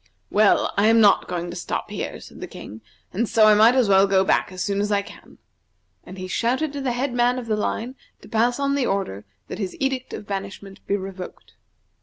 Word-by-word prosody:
"Well, 210 Hz, -1 st, +3 dB
I 205 Hz, +2 st, +4 dB
am 225 Hz, +1 st, +5 dB
not 205 Hz, -3 st, +5 dB
going 175 Hz, -1 st, -4 dB
to -, -, -8 dB
stop 175 Hz, -, -4 dB
here," -, -, -5 dB
said -, -, -13 dB
the -, -, -5 dB
King, 110 Hz, +2 st, -10 dB, 0.3 s
"and 220 Hz, +4 st, -1 dB
so 220 Hz, -1 st, +5 dB
I 215 Hz, -, +7 dB
might 220 Hz, +4 st, +6 dB
as 255 Hz, -4 st, +3 dB
well 195 Hz, 0 st, +5 dB
go 190 Hz, -1 st, +3 dB
back -, -, +1 dB
as 185 Hz, -1 st, -4 dB
soon 200 Hz, 0 st, -1 dB
as 205 Hz, +1 st, -1 dB
I 200 Hz, -1 st, +1 dB
can." -, -, -15 dB, 0.7 s
And 185 Hz, -, -11 dB
he 185 Hz, 0 st, -6 dB
shouted 260 Hz, +10 st, -1 dB
to 285 Hz, -, -4 dB
the 260 Hz, -3 st, -1 dB
head 255 Hz, +1 st, -2 dB
man 245 Hz, +1 st, +2 dB
of 250 Hz, -, -5 dB
the 220 Hz, -2 st, 0 dB
line 225 Hz, +3 st, -3 dB, 0.3 s
to -, -, -14 dB
pass 240 Hz, +3 st, +1 dB
on 280 Hz, 0 st, +1 dB
the 280 Hz, -3 st, 0 dB
order 105 Hz, -, -3 dB, 0.2 s
that -, -, -7 dB
his 190 Hz, -3 st, -4 dB
edict 265 Hz, -2 st, -2 dB
of 210 Hz, -, -7 dB
banishment 195 Hz, 0 st, -7 dB
be 200 Hz, -, +1 dB
revoked. 190 Hz, -1 st, -9 dB
210 Hz, 230 wpm, -23 LUFS, 195-245 Hz, 0.7 s, I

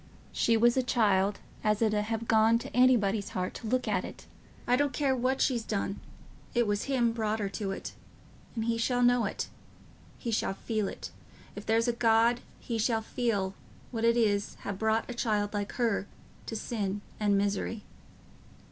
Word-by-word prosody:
she 230 Hz, -1 st, +2 dB
was 240 Hz, +1 st, +4 dB
a 260 Hz, -, +3 dB
child 205 Hz, -5 st, +2 dB, 0.3 s
as 210 Hz, -1 st, +2 dB
it 220 Hz, -2 st, +2 dB
'ud 210 Hz, 0 st, +1 dB
ha' 225 Hz, +1 st, -2 dB
gone 225 Hz, +1 st, +4 dB
t' -, -, -7 dB
anybody's 225 Hz, -5 st, +3 dB
heart 185 Hz, 0 st, -2 dB
to 225 Hz, -, -7 dB
look 255 Hz, +1 st, 0 dB
at... 195 Hz, -4 st, -2 dB, 0.4 s
I 245 Hz, -, +3 dB
don't 285 Hz, 0 st, +1 dB
care 270 Hz, -1 st, +1 dB
what 255 Hz, +2 st, 0 dB
she's 240 Hz, -4 st, +2 dB
done... 200 Hz, -2 st, -2 dB, 0.6 s
it 240 Hz, 0 st, +4 dB
was 205 Hz, -1 st, -1 dB
him 250 Hz, -4 st, +2 dB
brought 220 Hz, -1 st, -1 dB
her 205 Hz, -2 st, -2 dB
to 195 Hz, +1 st, -4 dB
it. 195 Hz, -, -5 dB, 0.6 s
And 225 Hz, -1 st, -1 dB
he 230 Hz, 0 st, 0 dB
shall 245 Hz, +1 st, +1 dB
know 245 Hz, -2 st, +4 dB
it... -, -, -3 dB, 0.7 s
he 235 Hz, -, -4 dB
shall 210 Hz, -3 st, 0 dB
feel 215 Hz, -1 st, -2 dB
it... -, -, -7 dB, 0.4 s
if 205 Hz, -, -8 dB
there's 225 Hz, +2 st, +3 dB
a -, -, +4 dB
just 235 Hz, -, -12 dB
God, 230 Hz, +1 st, +4 dB, 0.2 s
he 230 Hz, -2 st, -3 dB
shall 225 Hz, 0 st, +1 dB
feel 210 Hz, -5 st, -1 dB, 0.4 s
what 225 Hz, -2 st, -3 dB
it 230 Hz, +1 st, +4 dB
is 205 Hz, -3 st, +1 dB
t' -, -, -21 dB
ha' -, -, 0 dB
brought 220 Hz, +2 st, +1 dB
a 245 Hz, -, -5 dB
child 210 Hz, -3 st, 0 dB
like 205 Hz, -1 st, -3 dB
her 225 Hz, -5 st, 0 dB, 0.4 s
to 225 Hz, -, -4 dB
sin 205 Hz, -3 st, -2 dB, 0.2 s
and 205 Hz, -2 st, +3 dB
misery." 205 Hz, +2 st, -1 dB
225 Hz, 190 wpm, -30 LUFS, 205-240 Hz, 0.7 s, was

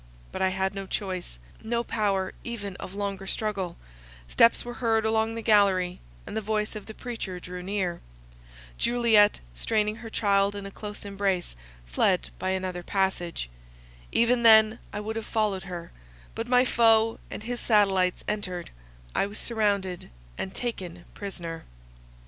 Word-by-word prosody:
But -, -, -4 dB
I 190 Hz, -, +4 dB
had 190 Hz, +1 st, -1 dB
no 195 Hz, -1 st, -5 dB
choice, 185 Hz, -, -3 dB, 0.3 s
no 235 Hz, +1 st, 0 dB
power 200 Hz, -5 st, 0 dB
even 205 Hz, -5 st, -5 dB
of 190 Hz, -, -8 dB
longer 200 Hz, -1 st, -3 dB
struggle; 195 Hz, -5 st, -2 dB, 0.5 s
steps 230 Hz, -, +4 dB
were 240 Hz, -, -5 dB
heard 225 Hz, -2 st, +2 dB
along 220 Hz, 0 st, +1 dB
the 230 Hz, -, -5 dB
gallery, 195 Hz, -4 st, +4 dB, 0.3 s
and -, -, -7 dB
the 220 Hz, -, 0 dB
voice 215 Hz, +1 st, -1 dB
of 210 Hz, -, -7 dB
the 220 Hz, -, -8 dB
preacher 225 Hz, -7 st, -5 dB
drew 180 Hz, +1 st, -7 dB
near. 185 Hz, -2 st, -2 dB, 0.8 s
Juliet, 230 Hz, -3 st, +4 dB
straining 210 Hz, -, 0 dB
her 230 Hz, -1 st, -8 dB
child 200 Hz, -2 st, +2 dB
in 200 Hz, -1 st, -5 dB
a 195 Hz, -, -7 dB
close 210 Hz, 0 st, -7 dB
embrace, 195 Hz, -, -1 dB, 0.3 s
fled -, -, +1 dB
by -, -, -1 dB
another 185 Hz, -1 st, -2 dB
passage. 175 Hz, -, -1 dB, 0.6 s
Even 235 Hz, +1 st, +3 dB
then 220 Hz, 0 st, +7 dB
I -, -, -4 dB
would 220 Hz, +2 st, -4 dB
have 225 Hz, -, -4 dB
followed 205 Hz, -4 st, 0 dB
her; 175 Hz, -2 st, -7 dB, 0.4 s
but 225 Hz, +1 st, -4 dB
my 250 Hz, +1 st, +5 dB
foe 225 Hz, -2 st, +4 dB
and -, -, -6 dB
his 240 Hz, +1 st, -3 dB
satellites 195 Hz, -4 st, +3 dB
entered; 185 Hz, -4 st, -3 dB, 0.4 s
I -, -, +2 dB
was 205 Hz, +1 st, -7 dB
surrounded, 200 Hz, -5 st, 0 dB, 0.3 s
and 190 Hz, -, -4 dB
taken 180 Hz, -8 st, -4 dB
prisoner. 170 Hz, -5 st, -6 dB
205 Hz, 155 wpm, -27 LUFS, 185-220 Hz, 0.8 s, then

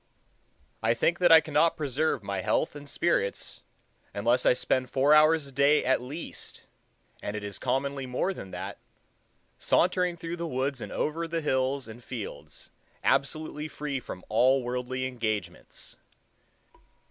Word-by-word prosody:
I 115 Hz, +1 st, +2 dB
think 170 Hz, +8 st, +1 dB
that 175 Hz, -2 st, +5 dB
I 160 Hz, -1 st, +10 dB
cannot 155 Hz, +2 st, +2 dB
preserve 145 Hz, -3 st, 0 dB
my 100 Hz, -1 st, -3 dB
health -, -, 0 dB
and 145 Hz, -1 st, -9 dB
spirits, 120 Hz, -14 st, -1 dB, 0.5 s
unless 120 Hz, +5 st, +2 dB
I -, -, +7 dB
spend 130 Hz, 0 st, 0 dB
four 140 Hz, +4 st, +4 dB
hours 155 Hz, 0 st, +5 dB
a 140 Hz, -, -9 dB
day 140 Hz, +3 st, +3 dB
at 130 Hz, -1 st, +2 dB
least—and 125 Hz, -6 st, -9 dB
it 105 Hz, -, -4 dB
is 100 Hz, -1 st, -6 dB
commonly 135 Hz, +1 st, -1 dB
more 130 Hz, +10 st, -1 dB
than 95 Hz, -, -9 dB
that—sauntering 180 Hz, -, -2 dB
through 165 Hz, +1 st, -5 dB
the 170 Hz, 0 st, -3 dB
woods 130 Hz, -2 st, -2 dB
and -, -, -6 dB
over 165 Hz, +2 st, -1 dB
the 165 Hz, 0 st, -2 dB
hills 130 Hz, -2 st, 0 dB
and 115 Hz, +2 st, -11 dB
fields, 120 Hz, -5 st, -8 dB, 0.3 s
absolutely 155 Hz, +1 st, 0 dB
free 150 Hz, -3 st, -4 dB
from 90 Hz, -6 st, -9 dB
all 130 Hz, +4 st, +3 dB
worldly 125 Hz, +1 st, -3 dB
engagements. 110 Hz, -8 st, -4 dB
135 Hz, 140 wpm, -28 LUFS, 125-155 Hz, 0.5 s, I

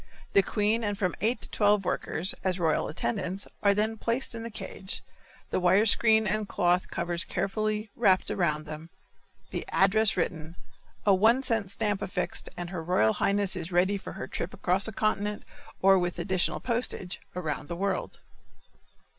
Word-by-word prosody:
The 200 Hz, -, +6 dB
queen 210 Hz, +4 st, 0 dB
and 205 Hz, -1 st, -1 dB
from 185 Hz, -3 st, 0 dB
eight 230 Hz, +5 st, +1 dB
to -, -, -8 dB
twelve 205 Hz, -2 st, +3 dB
workers, 180 Hz, +1 st, 0 dB
as 185 Hz, -1 st, 0 dB
royal 165 Hz, -4 st, +1 dB
attendants, 190 Hz, +3 st, -2 dB, 0.2 s
are 200 Hz, -1 st, +4 dB
then 220 Hz, +2 st, 0 dB
placed 240 Hz, +2 st, 0 dB
in 230 Hz, -, -6 dB
the 230 Hz, -, -5 dB
cage, 190 Hz, -2 st, -5 dB, 0.5 s
the -, -, +1 dB
wire 185 Hz, +4 st, +4 dB
screen 220 Hz, 0 st, +5 dB
and 210 Hz, 0 st, -1 dB
cloth 180 Hz, +1 st, +1 dB
covers 170 Hz, +1 st, -1 dB
carefully 210 Hz, +3 st, -2 dB
wrapped 190 Hz, -5 st, +3 dB
around 155 Hz, -4 st, 0 dB
them, 155 Hz, +2 st, -8 dB, 0.6 s
the -, -, -3 dB
address 215 Hz, +1 st, +3 dB
written, 160 Hz, 0 st, -2 dB, 0.5 s
a 200 Hz, -, +6 dB
one 225 Hz, +7 st, +4 dB
cent 225 Hz, -6 st, +1 dB
stamp 205 Hz, 0 st, -1 dB
affixed 180 Hz, -1 st, -2 dB
and 175 Hz, 0 st, -5 dB
her 180 Hz, -3 st, -4 dB
royal 160 Hz, -11 st, +3 dB
highness 200 Hz, -1 st, +1 dB
is 175 Hz, -1 st, -5 dB
ready 180 Hz, +3 st, +3 dB
for 195 Hz, -, -7 dB
her 130 Hz, -, -6 dB
trip 170 Hz, -, -4 dB
across 185 Hz, +3 st, +1 dB
a -, -, -4 dB
continent, 210 Hz, -1 st, -1 dB, 0.4 s
or, 195 Hz, 0 st, +6 dB
with 175 Hz, -1 st, -2 dB
additional 180 Hz, +1 st, +1 dB
postage, 230 Hz, -7 st, -2 dB, 0.2 s
around 155 Hz, -4 st, -3 dB
the 170 Hz, -, -4 dB
world. 195 Hz, +1 st, -2 dB
195 Hz, 170 wpm, -28 LUFS, 175-215 Hz, 0.6 s, The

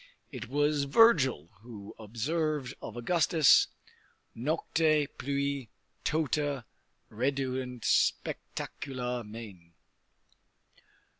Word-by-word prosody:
It -, -, -7 dB
was 145 Hz, +1 st, +1 dB
Virgil 140 Hz, -, +4 dB
who 110 Hz, -4 st, -10 dB
observed 135 Hz, +5 st, -2 dB
of -, -, -7 dB
Augustus: 155 Hz, 0 st, +4 dB, 0.7 s
Nocte 155 Hz, +3 st, +1 dB
pluit 140 Hz, -1 st, -2 dB, 0.4 s
tota 145 Hz, -4 st, 0 dB, 0.5 s
redeunt 130 Hz, 0 st, -2 dB
spectacula 125 Hz, -3 st, -1 dB
mane. 105 Hz, -6 st, -11 dB
135 Hz, 70 wpm, -30 LUFS, 120-150 Hz, 0.7 s, Virgil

